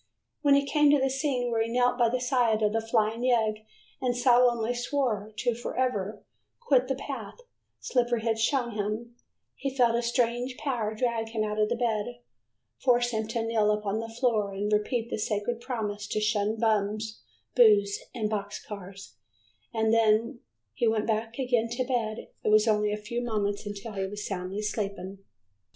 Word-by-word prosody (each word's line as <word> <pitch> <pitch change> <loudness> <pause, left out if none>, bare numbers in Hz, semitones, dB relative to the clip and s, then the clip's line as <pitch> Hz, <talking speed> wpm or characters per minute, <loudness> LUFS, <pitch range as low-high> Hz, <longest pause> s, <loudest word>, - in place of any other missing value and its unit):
When 285 -2 +5
he 280 0 +3
came 295 +1 +4
to 290 0 +5
the 270 0 +1
scene 265 -3 -1
where 225 -1 +1
he 225 - 0
knelt 245 +1 +3
by 235 -1 +4
the 255 +2 0
side 245 -4 +2
of 210 0 +2
the 225 - +1
flying 225 0 0
yegg 220 -4 +1 0.4
and 245 -1 0
solemnly 245 -2 +4
swore 245 -4 -1
to 240 +1 +1
forever 225 -4 -2 0.4
quit 265 - +3
the 270 - 0
path 265 - -7 0.4
Slippery 240 -3 0
had 225 -1 0
shown 240 +1 +1
him, 215 +3 -3 0.4
he 275 - -3
felt 235 -2 +4
a 235 - +1
strange 240 +1 0
power 230 -7 -2
drag 230 -1 -1
him 220 -1 -1
out 210 0 -2
of 210 0 +3
the 240 - +1
bed, 235 0 -1 0.6
force 245 -1 +3
him 220 -1 -2
to 225 0 -2
kneel 225 -2 +2
upon 210 0 0
the 225 0 -5
floor 225 -4 0
and 205 +2 -2
repeat 225 +2 0
the - - -2
sacred 215 +3 -2
promise 215 -5 -3
to 215 - -1
shun 210 0 +1
Bums, 215 - 0 0.3
Booze 205 -4 +5 0.2
and 220 -3 0
Boxcars 200 -2 -6 0.5
and 220 -1 +1
then, 220 -1 +5
when 235 +1 -9 0.3
he 235 - +1
went 220 0 +1 0.3
again 245 -4 +1
to 255 +1 0
bed, 235 -4 -2 0.2
it - - +1
was 215 +1 +5
only 210 -1 +2
a 210 - -1
few 235 +3 -4
moments 210 -3 -2
until 205 +2 -6
he 195 -1 -2
was 205 +1 -6
soundly 195 +2 -4
sleeping. 200 -2 -4
225 Hz, 175 wpm, -28 LUFS, 210-245 Hz, 0.6 s, When